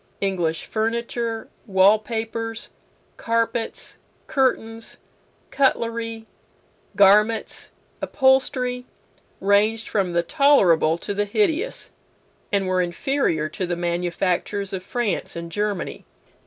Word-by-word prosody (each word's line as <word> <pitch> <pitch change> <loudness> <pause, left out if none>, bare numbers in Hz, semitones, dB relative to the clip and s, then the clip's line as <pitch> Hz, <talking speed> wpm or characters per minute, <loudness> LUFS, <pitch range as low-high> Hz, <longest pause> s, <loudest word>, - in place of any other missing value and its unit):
English 175 -5 -1
furniture, 230 0 -2 0.2
wall 195 +2 +5
papers, 225 +1 -4 0.5
carpets, 230 0 -2 0.3
curtains, 230 -6 -1 0.5
cutlery, 230 -4 0 0.7
garments, 210 +3 +3 0.3
upholstery, 260 -2 +2 0.5
ranged 210 +3 +2
from 195 -4 0
the 170 0 +1
tolerable 185 - +4
to 205 - -4
the 205 +1 0
hideous, 370 - 0 0.6
and 195 -2 +1
were 185 0 +2
inferior 175 - 0
to 185 +3 -4
the 175 - -1
manufactures 175 +3 -1
of 190 - -2
France 230 +3 -2
and 170 0 -6
Germany. 205 -1 -2
215 Hz, 95 wpm, -23 LUFS, 185-235 Hz, 0.7 s, wall